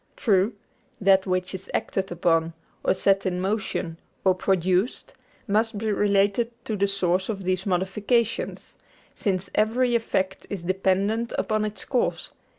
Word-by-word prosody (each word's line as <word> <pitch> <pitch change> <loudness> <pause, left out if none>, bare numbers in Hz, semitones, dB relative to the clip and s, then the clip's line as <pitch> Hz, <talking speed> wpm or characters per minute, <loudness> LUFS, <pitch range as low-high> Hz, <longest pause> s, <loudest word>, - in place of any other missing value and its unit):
True, 205 -1 +2 0.5
that 195 -1 +4
which 185 0 -1
is 190 +1 -7
acted 195 -1 -2
upon, 165 -1 +1 0.3
or - - +2
set 195 +1 +3
in 180 -1 -1
motion, 190 -4 -2 0.3
or 190 - +6
produced, 185 +3 0 0.3
must 220 +1 +1
be 215 +1 -1
related 205 +3 +2 0.2
to 220 - -2
the 200 0 +2
source 190 -1 0
of 200 -3 -3
these 185 +1 -1
modifications, 200 +5 -1 0.3
since 195 -3 -2
every 240 +3 +2
effect 190 -5 -1
is 195 -4 -4
dependent 195 +5 0
upon 215 0 0
its 215 0 -5
cause. 250 -3 -1
195 Hz, 140 wpm, -25 LUFS, 185-215 Hz, 0.5 s, or